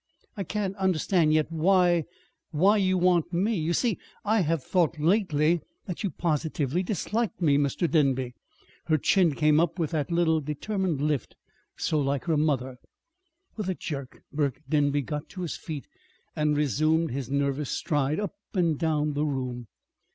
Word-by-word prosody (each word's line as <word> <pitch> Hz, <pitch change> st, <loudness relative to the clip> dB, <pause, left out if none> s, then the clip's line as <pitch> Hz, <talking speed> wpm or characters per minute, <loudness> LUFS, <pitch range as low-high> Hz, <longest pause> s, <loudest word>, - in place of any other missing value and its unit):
"I 200 Hz, -, -3 dB
can't 195 Hz, +1 st, -2 dB
understand 180 Hz, -3 st, +2 dB
yet 155 Hz, +1 st, +2 dB
why 175 Hz, 0 st, +3 dB, 0.4 s
why 190 Hz, +7 st, +4 dB
you 185 Hz, -2 st, +2 dB
want 175 Hz, -2 st, +2 dB
me. 190 Hz, +6 st, +1 dB
You 165 Hz, -4 st, -1 dB
see, 220 Hz, +2 st, +1 dB, 0.3 s
I 215 Hz, +2 st, +3 dB
I -, -, +3 dB
have 165 Hz, -4 st, 0 dB
thought 170 Hz, -1 st, +1 dB
lately 165 Hz, -1 st, +2 dB
that 155 Hz, -, -16 dB, 0.2 s
that 180 Hz, +1 st, -5 dB
you 200 Hz, -, +1 dB
positively 155 Hz, -2 st, -1 dB
disliked 220 Hz, +4 st, -2 dB
me, 145 Hz, -5 st, +3 dB
Mr. 145 Hz, +5 st, 0 dB
Denby." 135 Hz, -6 st, +1 dB, 0.5 s
Her 155 Hz, -2 st, +3 dB
chin 170 Hz, +1 st, +3 dB
came 150 Hz, 0 st, +4 dB
up 170 Hz, +1 st, +1 dB
with 165 Hz, -3 st, -1 dB
the 155 Hz, -3 st, +1 dB
little 165 Hz, -2 st, +2 dB
determined 160 Hz, +2 st, -2 dB
lift 150 Hz, -2 st, -1 dB, 0.4 s
so 155 Hz, -, 0 dB
like 140 Hz, -1 st, -1 dB
her 165 Hz, -2 st, +1 dB
mother. 135 Hz, -4 st, 0 dB, 0.8 s
With 210 Hz, -4 st, -3 dB
a 185 Hz, -, -1 dB
jerk 140 Hz, -7 st, -6 dB
Burke 145 Hz, -1 st, -1 dB
Denby 145 Hz, -2 st, +2 dB
got 150 Hz, +3 st, -5 dB
to 185 Hz, -, -7 dB
his 170 Hz, -, -3 dB
feet 150 Hz, -4 st, -6 dB, 0.5 s
and 150 Hz, -1 st, +1 dB
resumed 155 Hz, +3 st, +2 dB
his 130 Hz, -1 st, -4 dB
nervous 140 Hz, 0 st, 0 dB
stride 145 Hz, +1 st, 0 dB
up 205 Hz, -2 st, -3 dB, 0.2 s
and 170 Hz, -5 st, +1 dB
down 150 Hz, -2 st, +1 dB
the 145 Hz, +1 st, 0 dB
room. 125 Hz, -4 st, -3 dB
155 Hz, 165 wpm, -27 LUFS, 145-180 Hz, 0.8 s, why